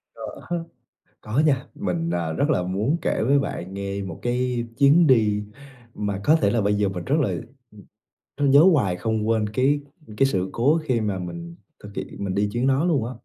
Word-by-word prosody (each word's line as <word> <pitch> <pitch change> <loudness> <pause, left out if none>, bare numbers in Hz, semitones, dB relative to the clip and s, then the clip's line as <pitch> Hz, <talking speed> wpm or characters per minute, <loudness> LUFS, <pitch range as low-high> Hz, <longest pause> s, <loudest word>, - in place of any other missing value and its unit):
Có. - - -9 0.7
Có 110 +6 -2
nha, 135 -4 +1
mình, 85 -3 -2
à, 85 -2 -1
rất 145 - 0
là 90 - +2
muốn 105 - 0
kể - - 0
với 140 +4 +3
bạn 95 -8 -4
nghe 100 0 -4
một 90 -4 -7
cái 120 0 -1
chuyến 150 +4 +5
đi 105 -5 +3 0.5
mà 100 -2 -3
có 155 - +5
thể 160 - +2
là 115 -2 +1
bây 100 +1 +1
giờ 100 -1 +1
mình 90 -2 -5
rất 140 - +1
là, - - +1 1.1
ừm, 140 -1 +2
nhớ 140 +2 +8
hoài 100 - +1
không 110 +3 -2
quên 110 -2 +1
cái 135 +6 +1 0.4
cái 135 - +4
sự 95 -7 -1
cố 145 +8 +2
khi 125 -7 0
mà 100 -3 -2
mình 170 - -7 0.3
thực 105 0 -11
hiện - - -4 0.2
mình 95 -1 -2
đi 105 +1 +1
chuyến 120 +3 0
đó 135 +5 +2
luôn 145 -10 +1
á. 125 - -5
115 Hz, 205 wpm, -23 LUFS, 100-140 Hz, 1.1 s, nhớ